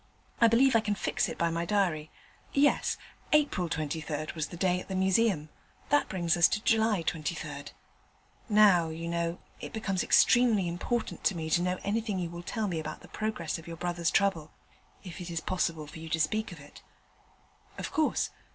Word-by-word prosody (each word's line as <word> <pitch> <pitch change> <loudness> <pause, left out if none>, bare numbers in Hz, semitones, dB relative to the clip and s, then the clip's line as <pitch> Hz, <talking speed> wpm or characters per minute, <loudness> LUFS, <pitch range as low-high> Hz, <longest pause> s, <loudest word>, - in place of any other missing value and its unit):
I 230 - +7
believe 245 +3 +4
I - - +7
can 210 -1 -1
fix - - -1
it - - -6
by 170 0 +1
my 170 +1 -1
diary. 170 -5 0 0.4
Yes, 285 +1 +3 0.4
April 285 - +2
23rd 155 -1 -3
was 155 -2 -2
the 175 - -9
day 180 0 +1
at - - -9
the 190 - -4
Museum; 190 -4 +2 0.4
that 290 +1 +3
brings 175 -4 +1
us 170 -1 +6
to 215 - -2
July 220 -5 +2
23rd. 155 -2 -4 0.8
Now, 200 -6 +5
you 165 +1 -5
know, 170 0 -1 0.2
it - - -8
becomes 195 -4 -1
extremely 235 -7 +4
important 220 +7 -3
to 195 - +3
me 160 -1 -4
to 175 - +3
know 180 +1 0
anything 215 0 -1
you 175 -2 -3
will 170 0 -7
tell 215 +4 -2
me 170 -4 -2
about 155 0 -6
the - - -14
progress 215 -7 -3
of 160 - -13
your 165 0 -7
brother's 175 -1 -1
trouble, 180 -6 +1 0.5
if 180 -1 -8
it 175 - -6
is 165 -1 -2
possible 165 -3 -1
for 150 +2 -10
you 160 0 -8
to 160 - 0
speak 215 +8 0
of 170 - -10
it.' 145 +1 -14 1.0
'Of - - -5
course. 315 -1 +1
175 Hz, 190 wpm, -29 LUFS, 165-210 Hz, 1.0 s, I